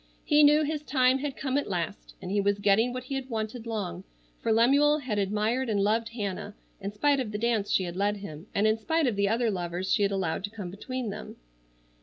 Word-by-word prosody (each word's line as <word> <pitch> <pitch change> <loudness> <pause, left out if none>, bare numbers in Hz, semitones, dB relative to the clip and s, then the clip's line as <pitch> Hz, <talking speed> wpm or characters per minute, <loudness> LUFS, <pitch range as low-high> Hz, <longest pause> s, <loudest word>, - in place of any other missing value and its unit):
He 300 -1 +5
knew 300 +1 +6
his 300 0 -2
time 260 -2 +2
had 280 -1 -4
come 270 0 0
at - - -5
last, 175 +1 -4
and 180 - -5
he 205 0 +2
was 200 0 +1
getting 205 +4 +3
what 255 0 -5
he 255 - -6
had 270 -1 -4
wanted 225 +1 -4
long, 190 -5 -4 0.4
for 230 - 0
Lemuel 280 +7 +5
had 250 -8 -2
admired 215 +6 0
and 205 -2 +1
loved 220 +3 +1
Hannah 205 -1 -4 0.3
in 200 +1 -3
spite 280 +7 +2
of 240 -5 -3
the 210 - -3
dance 225 -2 0
she 190 - +2
had 175 -1 -5
led 205 +2 0
him, 165 -3 -9
and 200 - +2
in 220 +1 +3
spite 320 +6 +1
of 240 -5 +1
the 200 0 +1
other 230 +1 +1
lovers 180 0 -2
she - - +2
had 200 0 +2
allowed 190 -2 -1
to - - -8
come 205 -5 -7
between 245 +3 -4
them. - - -8
215 Hz, 235 wpm, -28 LUFS, 200-255 Hz, 0.4 s, knew